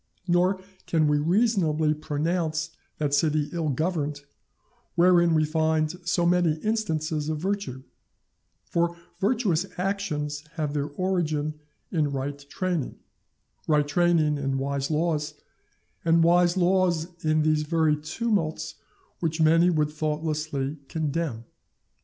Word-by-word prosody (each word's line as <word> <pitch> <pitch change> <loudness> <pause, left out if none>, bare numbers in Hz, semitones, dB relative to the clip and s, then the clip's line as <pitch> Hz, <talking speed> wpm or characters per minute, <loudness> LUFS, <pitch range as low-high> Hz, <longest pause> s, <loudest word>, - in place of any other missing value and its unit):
Nor 180 +2 +3 0.3
can 160 -2 +2
we 150 0 +3
reasonably 165 -4 +2
pronounce 160 +1 -1 0.3
that 145 -2 -1
city 150 0 +2
ill 165 -3 -1
governed 150 0 -1 0.7
wherein 175 -1 +5
we 155 0 +3
find 155 0 +1 0.2
so 175 -1 +2
many 175 -2 +3
instances 160 -8 -1
of 155 - -1
virtue; 180 -7 -3 0.8
for 170 0 0 0.2
virtuous 195 -5 +1
actions 155 -7 -2
have 150 -4 -2
their 145 -1 -1
origin 155 -2 -1 0.4
in 150 -5 +1
right 140 +1 -3
training, 180 -6 -2 0.7
right 150 -2 +3
training 155 -2 +2
in 135 -1 -1
wise 140 0 -2
laws, 155 -1 0 0.7
and 165 0 +4
wise 175 +1 +4
laws 180 -2 +2 0.2
in 155 0 +2
these 155 0 +2
very 155 0 +2
tumults 160 +2 -2 0.4
which 165 -1 -1
many 165 +2 +5
would 150 -3 +1
thoughtlessly 155 -2 -2
condemn. 155 -6 -2
155 Hz, 115 wpm, -26 LUFS, 150-175 Hz, 0.8 s, wherein